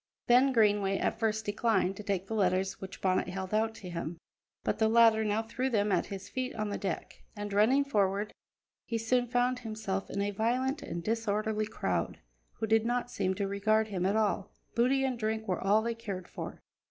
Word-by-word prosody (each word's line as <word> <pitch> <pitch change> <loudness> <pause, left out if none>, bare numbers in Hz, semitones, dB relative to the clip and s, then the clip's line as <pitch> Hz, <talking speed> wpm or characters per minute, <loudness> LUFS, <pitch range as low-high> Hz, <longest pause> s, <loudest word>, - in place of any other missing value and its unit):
Ben 255 +3 +5
Greenway 205 -4 +3
at 220 - -1
first 220 -1 0
declined 205 -2 +1
to 210 - -7
take 200 -3 -2
the 225 - -5
letters 190 -2 +1
which 190 0 -8
Bonnet 185 -1 +1
held 190 +1 -5
out 220 +1 +1
to 190 - -9
him, 170 -1 -4 0.5
but - - -1
the 220 - +4
latter 225 -1 +5
now 215 +1 0
threw 245 +4 -2
them 210 -4 +1
at - - +1
his 195 -1 -7
feet 255 0 -3
on 215 -1 -2
the 205 - -2
deck, 190 -4 -4
and, 205 -1 -5
running 235 +8 +4
forward, 205 -5 0 0.5
he 230 - -2
soon 245 +2 +1
found 245 +1 +1
himself 215 -4 -4
in 200 - -3
a 200 0 0
violent 250 +7 0
and 170 - -5
disorderly 215 0 0
crowd, 95 - -2 0.4
who - - -3
did 220 0 +3
not 245 +1 -1
seem 190 -1 0
to 200 0 -1
regard 215 +2 +1
him 185 -3 -2
at 200 - +1
all; 210 -2 +1 0.2
booty 260 +3 +3
and 255 -3 -1
drink 220 0 -2
were 185 - -1
all 210 +3 +3
they 235 0 -1
cared 200 -6 -6
for. - - -7
215 Hz, 200 wpm, -31 LUFS, 195-230 Hz, 0.5 s, Ben